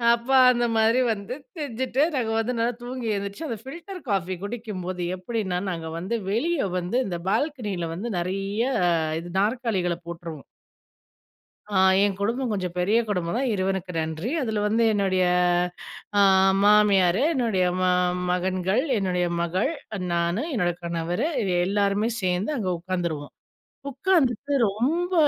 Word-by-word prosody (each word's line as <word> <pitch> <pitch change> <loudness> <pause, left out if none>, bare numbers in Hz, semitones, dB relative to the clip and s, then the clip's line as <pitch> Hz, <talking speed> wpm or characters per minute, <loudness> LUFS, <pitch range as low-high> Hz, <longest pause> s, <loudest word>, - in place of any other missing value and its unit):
அப்ப 235 +2 -12 0.2
அந்த 240 -1 +1
மாதிரி 225 +3 +4
வந்து 205 +2 -4 0.2
செஞ்சுட்டு, 260 -2 -2
நாங்க 230 -4 0
வந்து 245 +3 -1
நல்லா 235 +2 +1
தூங்கி 245 -1 -5
எழுந்திரிச்சு 200 +9 -5
அந்த 230 - -3
பில்டர் 340 +7 -8
காஃபி 185 -2 0
குடிக்கும்போது 200 -5 -5 0.2
எப்படின்னா 190 -1 -2
நாங்க 165 -2 -5
வந்து 190 +7 -2 0.2
வெளிய 290 - 0
வந்து 180 +7 -1
இந்த 175 -3 -3
பால்கனியில 210 - -1
வந்து 205 +7 -4
நிறைய 195 +5 -2 0.6
இது 170 +1 -8
நாற்காலிகள 205 -6 0
போட்டுருவோம். 165 -3 -7 1.3
ஆ - - +5 0.2
ஏங் 200 -1 +1
குடும்பம் 235 +4 -1
கொஞ்சம் 185 -4 -3
பெரிய 205 +6 +3
குடும்பம் 180 -2 -1
தான் 260 -1 0
இறைவனுக்கு 190 -2 -1
நன்றி. 160 +6 -3
அதுல 220 -5 -1
வந்து 225 +2 +2
என்னுடைய 190 -3 +2 0.9
ஆ - - +6 0.4
மாமியாரு, 205 -2 +5
என்னுடைய 225 - +1 0.2
ம - - +2 0.5
மகன்கள், 185 +5 +1
என்னுடைய 180 -3 0 0.2
மகள், 180 - 0 0.4
நானு, 170 +7 0
என்னோட 180 -8 +1
கணவரு 170 - -1 0.4
எல்லோருமே 200 +2 +1
சேர்ந்து 185 +7 0
அங்க 200 -6 -1
உட்காந்துருவோம். 170 -5 -3 0.6
உட்காந்துட்டு 280 - +1 0.2
ரொம்ப 325 - 0
200 Hz, 130 wpm, -25 LUFS, 180-235 Hz, 1.3 s, ஆ